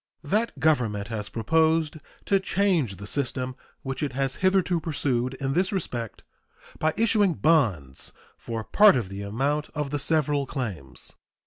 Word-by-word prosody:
That 215 Hz, +10 st, 0 dB
Government 115 Hz, -10 st, +1 dB
has 105 Hz, -3 st, -4 dB
proposed 160 Hz, +6 st, +2 dB, 0.3 s
to 195 Hz, -1 st, +3 dB
change 180 Hz, -, +1 dB
the 100 Hz, -, -8 dB
system 130 Hz, +1 st, -2 dB, 0.3 s
which 135 Hz, +1 st, -4 dB
it 145 Hz, -4 st, -2 dB
has 135 Hz, 0 st, -1 dB
hitherto 185 Hz, -2 st, +3 dB
pursued 130 Hz, -5 st, -1 dB
in 135 Hz, 0 st, -2 dB
this 185 Hz, +5 st, +1 dB
respect 120 Hz, -, -4 dB, 0.6 s
by 155 Hz, 0 st, +1 dB
issuing 210 Hz, -5 st, +3 dB
bonds 105 Hz, -, +1 dB, 0.2 s
for 115 Hz, -1 st, -5 dB
part 210 Hz, -, +6 dB
of 115 Hz, -7 st, -1 dB
the 100 Hz, +1 st, -6 dB
amount 135 Hz, +9 st, -1 dB
of 150 Hz, -2 st, -2 dB
the 145 Hz, -, -1 dB
several 145 Hz, -1 st, +1 dB
claims. 105 Hz, -, -5 dB
140 Hz, 145 wpm, -26 LUFS, 115-160 Hz, 0.6 s, part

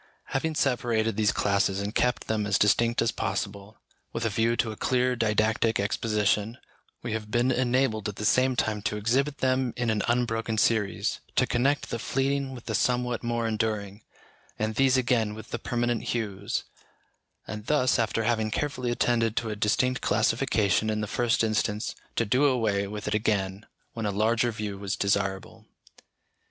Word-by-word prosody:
Having 155 Hz, +4 st, -1 dB
separated 115 Hz, -6 st, +1 dB
these 105 Hz, -1 st, +2 dB
classes 100 Hz, -1 st, +1 dB
and 100 Hz, +1 st, -3 dB
kept 125 Hz, 0 st, +1 dB
them 110 Hz, -2 st, -1 dB
as 100 Hz, -, +2 dB
distinct 115 Hz, +3 st, +3 dB
as 115 Hz, -, +1 dB
possible, 100 Hz, +1 st, -4 dB, 0.3 s
with 115 Hz, 0 st, -3 dB
a 110 Hz, -, 0 dB
view 115 Hz, +3 st, +1 dB
to 115 Hz, -2 st, 0 dB
a -, -, -7 dB
clear, 125 Hz, +2 st, +1 dB
didactic 110 Hz, 0 st, +1 dB
exposition, 105 Hz, +2 st, 0 dB, 0.5 s
we 120 Hz, -2 st, -3 dB
have 110 Hz, -1 st, -4 dB
been 120 Hz, +3 st, +2 dB
enabled 120 Hz, -4 st, +1 dB
at 105 Hz, -, -7 dB
the 105 Hz, -, -4 dB
same 130 Hz, +3 st, +3 dB
time 110 Hz, -3 st, 0 dB
to 105 Hz, +1 st, -2 dB
exhibit 135 Hz, +7 st, +1 dB
them 130 Hz, -1 st, +1 dB
in 120 Hz, -2 st, +1 dB
an 105 Hz, -2 st, 0 dB
unbroken 115 Hz, -2 st, 0 dB
series, 105 Hz, -2 st, +1 dB, 0.2 s
to -, -, +4 dB
connect 135 Hz, +4 st, 0 dB
the 115 Hz, -, -2 dB
fleeting 135 Hz, +2 st, -1 dB
with 120 Hz, -, -11 dB
the 110 Hz, -, -3 dB
somewhat 125 Hz, +2 st, 0 dB
more 120 Hz, -1 st, -1 dB
enduring, 110 Hz, -2 st, -2 dB, 0.6 s
and 110 Hz, 0 st, -1 dB
these 135 Hz, +2 st, +3 dB
again 120 Hz, -4 st, +1 dB
with 110 Hz, -, -11 dB
the 120 Hz, -, -3 dB
permanent 120 Hz, 0 st, -1 dB
hues; 100 Hz, -4 st, -2 dB, 0.8 s
and 105 Hz, +1 st, -7 dB
thus, 130 Hz, -5 st, +2 dB
after 115 Hz, 0 st, 0 dB
having 110 Hz, -1 st, +1 dB
carefully 130 Hz, 0 st, -2 dB
attended 115 Hz, -2 st, +1 dB
to 115 Hz, -2 st, -1 dB
a -, -, -3 dB
distinct 125 Hz, +5 st, +1 dB
classification 105 Hz, 0 st, +1 dB
in 110 Hz, 0 st, -1 dB
the -, -, -1 dB
first 115 Hz, +2 st, +1 dB
instance, 110 Hz, -1 st, 0 dB, 0.2 s
to 115 Hz, -, +1 dB
do 125 Hz, +7 st, +3 dB
away 110 Hz, -7 st, +1 dB
with 105 Hz, +1 st, -6 dB
it -, -, 0 dB
again 100 Hz, -1 st, -1 dB, 0.3 s
when 115 Hz, -2 st, -3 dB
a -, -, 0 dB
larger 110 Hz, +4 st, +1 dB
view 105 Hz, -3 st, -5 dB
was 100 Hz, 0 st, -2 dB
desirable. 95 Hz, -1 st, -2 dB
110 Hz, 170 wpm, -27 LUFS, 105-120 Hz, 0.8 s, to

